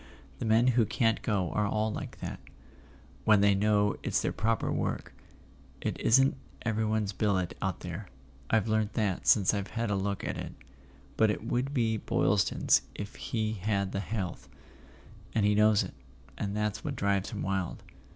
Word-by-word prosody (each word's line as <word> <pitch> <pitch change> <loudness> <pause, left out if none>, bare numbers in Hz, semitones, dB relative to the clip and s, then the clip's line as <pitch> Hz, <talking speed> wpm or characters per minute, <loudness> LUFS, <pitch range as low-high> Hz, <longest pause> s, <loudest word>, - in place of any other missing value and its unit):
The - - -3
men 115 +3 +4
who 120 -1 +4
can't 115 -2 +1
go 95 -6 0
are 105 -1 +1
all 110 +1 0
like - - -7
that, - - -5 0.9
wdien 105 -2 +6
they 100 0 +5
know 105 +1 +2
it's - - 0
their - - -1
proper 115 +1 0
work. - - -2 0.7
It - - -3
isn't 135 +4 +4 0.3
everybody's 110 -2 0
billet 95 -4 0
out - - -2
there—I've 65 - -4
learnt 110 -1 +1
that 105 -6 -1
since 100 -2 +5
I've 100 -1 -2
had 115 -2 0
a - - +2
look 100 0 -2
at - - -3
it—but 70 +8 -4
it 105 - -2
would 125 +4 -1
be 115 -5 +1
Boylston's 100 -1 +2
if 100 0 -6
he 110 -2 -2
had 100 -1 -1
the 100 - -2
health, 100 -3 -4 0.9
and 110 -2 +3
he 105 - +4
knows 105 0 +4
it, - - -7 0.4
and 100 +5 -3
that's 105 0 -1
what 145 -2 -3
drives 100 -3 0
him 105 - -4
wild." 95 -2 -2
105 Hz, 165 wpm, -30 LUFS, 100-110 Hz, 0.9 s, wdien